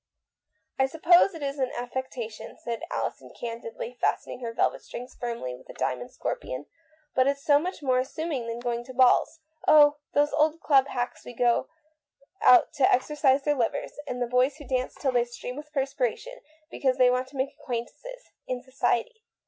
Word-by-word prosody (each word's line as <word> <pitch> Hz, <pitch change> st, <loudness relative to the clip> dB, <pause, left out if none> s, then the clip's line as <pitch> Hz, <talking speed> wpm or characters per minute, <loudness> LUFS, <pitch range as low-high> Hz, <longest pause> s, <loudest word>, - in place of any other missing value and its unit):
" -, -, -46 dB
I 265 Hz, -, +4 dB
suppose 340 Hz, +5 st, +4 dB
it 315 Hz, -, -7 dB
is 280 Hz, 0 st, -3 dB
an 260 Hz, -1 st, 0 dB
affectation," 245 Hz, -2 st, -5 dB
said 235 Hz, -1 st, -5 dB
Alison -, -, -3 dB
candidly, 230 Hz, 0 st, -6 dB
fastening -, -, -1 dB
her 235 Hz, -2 st, -4 dB
velvet 230 Hz, -, 0 dB
strings 250 Hz, +1 st, -8 dB
firmly 235 Hz, -, -4 dB
with 125 Hz, +1 st, -14 dB
a -, -, -8 dB
diamond 125 Hz, -1 st, -2 dB
scorpion, 130 Hz, +3 st, -4 dB, 0.3 s
" 310 Hz, -1 st, -36 dB
but 260 Hz, 0 st, +3 dB
it's 280 Hz, 0 st, 0 dB
so 290 Hz, -1 st, +6 dB
much 350 Hz, -1 st, -5 dB
more 255 Hz, -2 st, +2 dB
amusing 265 Hz, -1 st, -3 dB
than 230 Hz, 0 st, -3 dB
going 240 Hz, -1 st, -2 dB
to 260 Hz, 0 st, -10 dB
balls. 260 Hz, +5 st, +4 dB, 0.3 s
Oh, 295 Hz, -1 st, +7 dB, 0.2 s
those 290 Hz, +1 st, +2 dB
old 310 Hz, +2 st, +2 dB
club 275 Hz, -4 st, +4 dB
hacks 245 Hz, -2 st, -3 dB
who 245 Hz, -, -10 dB
go 240 Hz, +2 st, +2 dB, 0.7 s
out 250 Hz, -, +6 dB
to 270 Hz, -, +4 dB
exercise 275 Hz, 0 st, +2 dB
their 295 Hz, -, +2 dB
livers, 250 Hz, +1 st, -2 dB
and 250 Hz, -, -4 dB
the 245 Hz, -, +1 dB
boys 250 Hz, +3 st, +2 dB
who 295 Hz, -1 st, -12 dB
dance 255 Hz, 0 st, -1 dB
till 270 Hz, -, 0 dB
they 245 Hz, -1 st, +3 dB
stream 245 Hz, +1 st, -7 dB
with 300 Hz, +1 st, -9 dB
perspiration, 275 Hz, -, -2 dB, 0.3 s
because 260 Hz, -2 st, 0 dB
they 250 Hz, -1 st, +5 dB
want 255 Hz, +1 st, 0 dB
to 270 Hz, +1 st, -12 dB
make 270 Hz, +2 st, -1 dB
acquaintances -, -, -6 dB
— -, -, -54 dB
in 250 Hz, -1 st, -3 dB
society." 440 Hz, -, -1 dB
260 Hz, 190 wpm, -27 LUFS, 245-290 Hz, 0.7 s, Oh